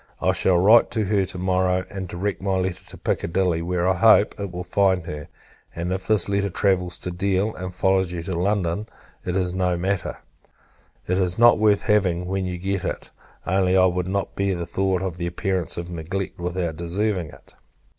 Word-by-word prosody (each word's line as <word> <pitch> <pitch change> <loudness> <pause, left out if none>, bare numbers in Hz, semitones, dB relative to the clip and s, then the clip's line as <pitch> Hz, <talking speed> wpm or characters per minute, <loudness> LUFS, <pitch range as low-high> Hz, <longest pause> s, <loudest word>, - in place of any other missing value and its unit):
I - - +2
shall 90 -2 +3
write 105 +6 +6
to 110 - +1
her 100 -1 +1
to 90 - -7
morrow, 90 0 +1
and 95 -1 -5
direct 95 +4 -3
my 95 -1 0
letter 95 -1 -2
to - - -9
Piccadilly; 85 -1 0
where, 90 +1 -1
I 95 - +4
hope, 105 +2 +5
it 100 -2 -4
will 90 0 -5
find 95 -1 +1
her: 75 -2 -6 0.5
and, 85 +2 -2
if 95 0 -5
this 110 -5 +2
letter 100 0 0
travels 90 -1 0
to 90 - -5
Deal, 95 +3 0
and 95 0 -6
follows 95 0 +1
you 85 -2 -4
to 95 - -4
London, 95 +2 -1 0.4
it 90 +1 -2
is 90 -1 0
no 90 -1 0
matter; 95 +1 -2 0.9
it 90 +1 0
is 90 -1 0
not 120 -1 +6
worth 105 -2 +3
having, 95 -5 +1
when 95 0 -2
you 90 -1 -4
get 95 +1 -2
it. - - -5 0.3
Only, 95 0 +2
I 95 -1 +5
could 90 0 -2
not 100 +1 -2
bear 100 -1 0
the 85 -1 -4
thoughts 95 +1 -1
of 90 -3 -4
the 85 0 -3
appearance 95 -1 -1
of 85 +1 -5
neglect, 90 +4 -4
without 90 -2 -3
deserving 90 +1 -1
it. - - -16
95 Hz, 200 wpm, -23 LUFS, 90-95 Hz, 0.9 s, write